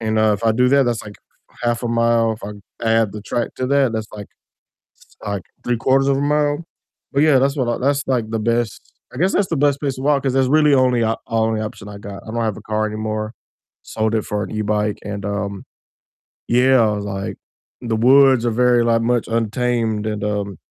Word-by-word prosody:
and, 110 -1 -1
uh, 110 -1 +4
if 100 - -7
I 110 - +4
do 125 +2 +3
that, 140 0 +4
that's, 120 -2 -1
like, 105 -1 -10 0.5
half 120 0 0
a 120 - -2
mile, 115 -1 +2
if 110 - -9
I 105 - -6 0.3
add 115 -2 +2
the 105 - -7
track 120 +2 -3
to 130 - -2
that, 140 -3 +2
that's, 110 -1 -3
like 105 -1 -9 0.7
it's, - - -25
like, 100 -3 -3 0.2
3 120 -1 0
quarters 135 +3 +2
of 135 -1 +2
a - - -1
mile, 145 +2 +1 0.5
but, 140 - +1
yeah, 150 -4 +5
that's 140 +2 +1
what 125 -4 -1
I 120 - 0
that's 140 +2 0
like 120 -4 0
the 115 - -2
best 115 +1 -2 0.2
I - - -9
guess 185 +5 +2
that's 200 - +2
the 165 - -2
best 140 0 +2
place 140 -3 -2
to 130 - -8
walk 140 -1 +2
'cause 130 -2 0
that's 130 -1 +2
really 150 -1 +4
only 125 -3 +3
o 115 0 +1
only 110 -1 0
option 105 -2 -7
I 100 0 -8
got, 100 -1 -9
I 110 - -8
don't 115 0 -2
have 110 -3 -2
a - - -10
car 110 0 -1
anymore, 110 +1 -4 0.5
sold 110 0 -1
it 110 - -1
for 105 0 -2
an - - -7
e-bike 105 -1 -1
and, 100 -1 -5
um 100 -1 -3 0.8
yeah, 125 +1 +4
like, 100 -2 -3 0.4
the 115 -2 -2
woods 130 0 +5
are 120 - +1
very, 120 0 +3
like, 115 -1 +2
much 120 0 0
untamed 115 -1 -1
and, 105 -1 -3
um 100 -3 -3
115 Hz, 225 wpm, -20 LUFS, 105-130 Hz, 0.8 s, yeah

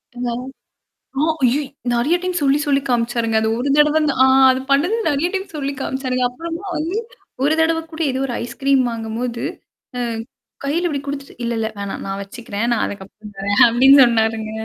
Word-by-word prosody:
இருந்தாலும் 245 +1 -4 0.7
ஆ. - - +2 0.2
அய்யோ! 255 +4 +3 0.3
நெறையா 275 +9 +2
டைம் 365 -1 -1
சொல்லி 280 +1 +3
சொல்லி 280 -1 +2
காமிச்சாருங்க. 230 -2 +1
அது 220 - +1
ஒரு 275 - -1
தடவ 300 +1 +4
ந்த 285 - +1
ஆ - - +7 0.3
அது 260 - -1
பண்ணது 335 +11 +3
நெறையா 290 +4 0
டைம் 385 0 -2
சொல்லி 280 -1 -2
காமிச்சாருங்க. 255 -2 -2
அப்புறமா 335 +8 -7
வந்து, 330 +6 -2 0.5
ஒரு 295 +3 +3
தடவ 325 0 +2
கூட, 315 - -6
ஏதோ 260 - -3
ஒரு 245 - -4
ஐஸ்கிரீம் 270 +2 +1
வாங்கும்போது 230 +1 -4 0.6
ம். 230 -2 -2 0.4
கையில 330 +6 0
இப்டி 290 -4 -2
குடுத்துட்டு 280 0 -6
"இல்ல 235 0 -1
இல்ல 220 -1 -1
வேணாம். 200 -1 -5
நான் 195 0 -4
வச்சுக்கிறேன். 210 +1 -4
நான் 235 - +1
அதுக்கப்புறம் 205 +1 -9
தரேன்" 200 +5 +3
அப்டின்னு 265 +4 +6
சொன்னாருங்க. 220 -2 +1
255 Hz, 170 wpm, -20 LUFS, 230-290 Hz, 0.7 s, ஆ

